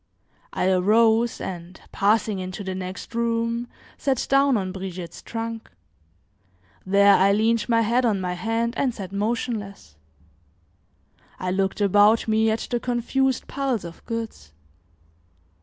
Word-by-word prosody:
I - - 0
arose 220 +5 +3
and, 180 0 -7
passing 210 0 +1
into 185 +2 -5
the 190 -1 -4
next 185 +3 -7
room, 230 0 -1 0.3
sat 265 -3 0
down 275 -2 +4
on 190 -2 -3
Brigitte's 185 -2 -7
trunk. 225 0 -6 1.1
There, 200 +1 +5
I 195 +1 +4
leaned 225 +2 +1
my 230 -1 +4
head 235 +3 +2
on 215 -5 +1
my 180 -1 -2
hand 225 +5 -1
and 255 -4 0
sat 190 -3 -7
motionless. 205 - -3 1.4
I 185 0 -2
looked 195 +2 -1
about 205 +3 +4
me 220 0 +3
at 220 +1 -1
the 240 - +1
confused 250 +2 0
piles 265 -8 -2
of 170 -1 -10
goods. 225 - -6
220 Hz, 130 wpm, -24 LUFS, 190-230 Hz, 1.4 s, There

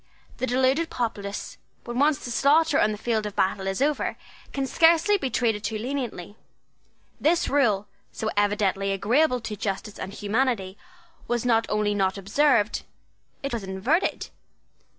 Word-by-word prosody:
The 260 - -2
deluded 260 +6 +2
populace, 205 -4 -4 0.2
when 240 +1 -4
once 290 0 +2
the 240 - -5
slaughter 295 +4 +3
on 215 - +3
the 210 - -4
field 220 -1 -1
of 205 - -8
battle 190 0 0
is 195 +7 0
over, 295 0 0 0.3
can 275 -1 -2
scarcely 330 +8 +4
be 275 -10 -1
treated 220 -3 0
too 220 - -2
leniently. 235 -6 -4 0.8
This 335 +3 +2
rule, 220 -8 +2 0.3
so 220 - -3
evidently 205 -1 +1
agreeable 250 +7 +2
to 220 -1 -5
justice 200 0 -4
and 190 - -5
humanity, 205 -2 -1 0.5
was 240 0 -1
not 225 -2 +2
only 210 -1 +1
not 195 -1 0
observed: 210 +2 +2 0.6
it 275 - -3
was 230 -4 -3
inverted. 195 - -1
225 Hz, 150 wpm, -25 LUFS, 205-275 Hz, 0.8 s, scarcely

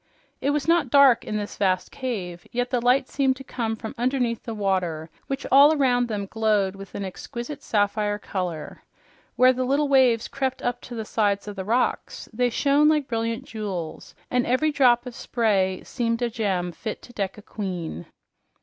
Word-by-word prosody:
It 280 - +1
was 290 0 0
not 335 -5 +3
dark 275 -2 +6
in 215 - -3
this 205 -1 -5
vast 185 -2 +1
cave, 190 -10 -5
yet 245 +1 -2
the 250 -2 +1
light 255 +2 +3
seemed 270 -2 +1
to 270 - -10
come 230 -4 -3
from 220 0 -7
underneath 245 -2 0
the 230 - -6
water, 180 -6 -1 0.2
which 275 0 -3
all 285 +3 +7
around 245 -3 +2
them 205 -3 -3
glowed 210 -2 +1
with 195 -1 -11
an 200 - -3
exquisite 235 +8 -7
sapphire 205 0 0
color. 180 -7 -5 0.5
Where 255 +1 +6
the 255 0 -1
little 280 +3 +1
waves 255 -5 +4
crept 265 -2 -3
up 245 0 -1
the 230 -3 -6
sides 205 -2 0
of 205 - -6
the 190 -1 -5
rocks 240 +4 -1
they 245 +2 +1
shone 285 +5 +3
like 300 -3 +1
brilliant 230 +1 -2
jewels, 195 -9 -6 0.2
and 250 -1 +1
every 280 +5 +2
drop 245 -4 +4
of 250 - -7
spray 200 -7 0
seemed 230 -1 -1
a 235 - 0
gem 190 -6 -1
fit 215 +6 -6
to 245 - -14
deck 195 -3 -3
a 210 - -12
queen. 180 - -5
230 Hz, 185 wpm, -24 LUFS, 200-255 Hz, 0.5 s, all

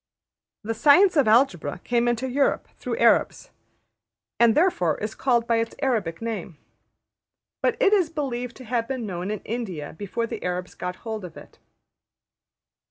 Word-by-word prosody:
The 225 +2 -2
science 325 - +5
of 285 -6 +4
Algebra 215 - +2
came 240 0 +1
into 240 +2 0
Europe 275 +2 0
through - - -4
Arabs, - - +2 0.9
and 235 -2 +5
therefore 295 - +2
is 215 +1 -4
called 240 -3 +1
by 230 -1 +2
its 230 0 -2
Arabic 225 - -1
name. 200 -8 -5 1.0
But 465 - +1
it 425 -5 +4
is 370 -6 +3
believed 250 -6 -4
to 255 - -11
have 230 0 -1
been 255 -3 -3
known 180 -1 -4
in 210 -1 -3
India 195 -10 -5
before 205 +5 -3
the - - -6
Arabs 180 0 -3
got 180 0 -5
hold 220 -2 -4
of 180 - -9
it. - - -14
230 Hz, 160 wpm, -24 LUFS, 195-260 Hz, 1.0 s, science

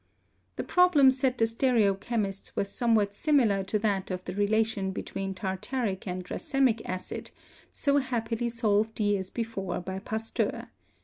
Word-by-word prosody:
The - - -3
problem 345 -7 +5
set 260 -1 0
the 225 - +4
stereochemists 220 -3 0
was 200 - -1
some 235 -2 +2
what 205 -2 +2
similar 225 -6 +2
to 205 +3 0
that 205 -3 0
of 185 -1 -4
the 180 - -4
relation 205 0 +1
between 195 0 -4
tartaric 195 +2 -3
and 180 0 -4
racemic 265 - +1
acid, 185 0 -5 0.4
so 280 0 +1
happily 235 -2 -2
solved 220 -1 +1
years 205 -3 +1
before 210 -6 -3
by 190 +1 -5
Pasteur. 220 +2 -2
215 Hz, 140 wpm, -28 LUFS, 195-240 Hz, 0.4 s, problem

